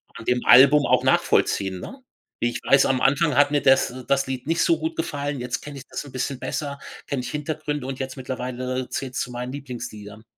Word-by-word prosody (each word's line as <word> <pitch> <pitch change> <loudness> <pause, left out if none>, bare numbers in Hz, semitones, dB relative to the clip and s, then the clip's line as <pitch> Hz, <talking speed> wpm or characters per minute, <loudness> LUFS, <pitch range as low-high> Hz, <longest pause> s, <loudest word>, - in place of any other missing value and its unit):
an 115 - -9
dem 125 0 0
Album 140 +3 +7
auch - - +3
nachvollziehen, 95 -2 +2
ne? 265 - -9 0.4
Wie 120 - +1
ich - - -5
weiß, 135 0 +5
am 130 -1 +1
Anfang 145 +1 +2
hat 145 +1 +5
mir 145 -1 +1
das 135 -2 +4 0.2
das 135 -1 +1
Lied 130 -1 -4
nicht 165 +3 +1
so 165 - +3
gut 160 +1 -3
gefallen. 145 -3 -3
Jetzt 125 +1 -3
kenne 145 -1 -9
ich - - -13
das - - -6
'n 140 - -11
bisschen 130 +1 -3
besser, 140 -1 -4 0.3
kenne 140 -3 -2
ich - - -5
Hintergründe 150 -2 -3
und 135 - -4
jetzt 130 -1 -5
mittlerweile 130 0 -4
zählt's 130 -2 -3
zu 125 - -4
meinen 125 +1 -5
Lieblingsliedern. 110 -6 -8
135 Hz, 215 wpm, -23 LUFS, 125-145 Hz, 0.4 s, Album